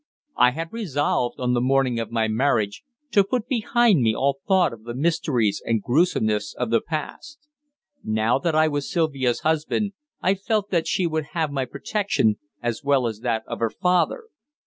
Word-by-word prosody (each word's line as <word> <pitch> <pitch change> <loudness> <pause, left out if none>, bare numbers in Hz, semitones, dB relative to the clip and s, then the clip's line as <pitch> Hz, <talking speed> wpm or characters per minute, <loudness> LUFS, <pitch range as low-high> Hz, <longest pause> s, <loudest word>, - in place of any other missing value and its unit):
I 125 - +6
had 165 - -6
resolved, 145 - -1
on 125 -1 0
the 120 - +1
morning 130 -2 +2
of 115 - -3
my 115 -1 0
marriage, 110 -3 0 0.3
to 200 - +5
put 225 +3 -2
behind 235 - +3
me 110 -2 +2
all 140 +1 0
thought 185 -9 +3
of 110 -1 -12
the 120 +1 -6
mysteries 135 -7 0
and 115 -1 +1
gruesomeness 110 - +1
of 125 -2 -3
the 115 - +3
past. 300 - -6 0.6
Now 110 +4 +1
that 160 +2 -1
I 155 0 +4
was 145 -2 -3
Sylvia's 140 -8 0
husband, 160 +6 0 0.3
I 190 - +2
felt 205 +1 -2
that 170 -3 +1
she 190 -3 +1
would 160 -2 -1
have 160 -3 0
my 135 -2 -1
protection, 140 - 0 0.2
as 120 +4 -2
well 140 -3 +2
as 110 -2 -3
that 115 -2 -1
of - - -6
her 115 - +1
father. 180 - +1
140 Hz, 180 wpm, -23 LUFS, 120-175 Hz, 0.6 s, I